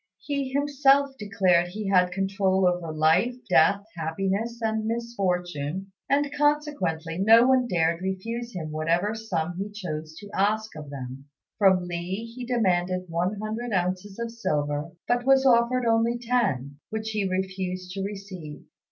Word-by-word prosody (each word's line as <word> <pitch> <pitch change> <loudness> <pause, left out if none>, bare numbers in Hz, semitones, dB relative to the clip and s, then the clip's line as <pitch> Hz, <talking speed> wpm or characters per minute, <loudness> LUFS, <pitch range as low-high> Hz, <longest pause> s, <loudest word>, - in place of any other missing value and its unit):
He 280 -2 -3
himself 280 -1 +3
declared 185 -4 +2
he 205 +3 -5
had 180 -2 +4
control 195 0 +1
over 175 -2 -1
life, 160 +10 +3
death, 200 +2 +4
happiness, 195 +8 -2
and 220 -1 -1
misfortune; 190 -7 -2 0.2
and 285 +1 +2
consequently 290 - 0
no 225 +4 +7
one 260 -1 +4
dared 170 -3 +1
refuse 230 +6 -4
him 160 -3 -4
whatever 170 +7 0
sum 175 -6 -3
he 200 +2 -3
chose 160 -7 -6
to 205 -1 -10
ask 215 +2 0
of 150 -2 -8
them. 135 -1 -7 0.3
From 190 -3 +5
Li 175 +5 -4
he 240 +1 -8
demanded 185 -6 +1
one 175 +4 0
hundred 220 +2 -4
ounces 185 +2 -1
of 235 0 -4
silver, 150 -8 -1 0.2
but 245 0 +1
was 270 +1 +4
offered 245 0 +4
only 230 +1 +2
ten, 205 - -1
which 220 0 -3
he 205 -3 -1
refused 185 -1 -3
to 195 +1 -4
receive. 195 -6 -7
195 Hz, 145 wpm, -26 LUFS, 175-230 Hz, 0.3 s, no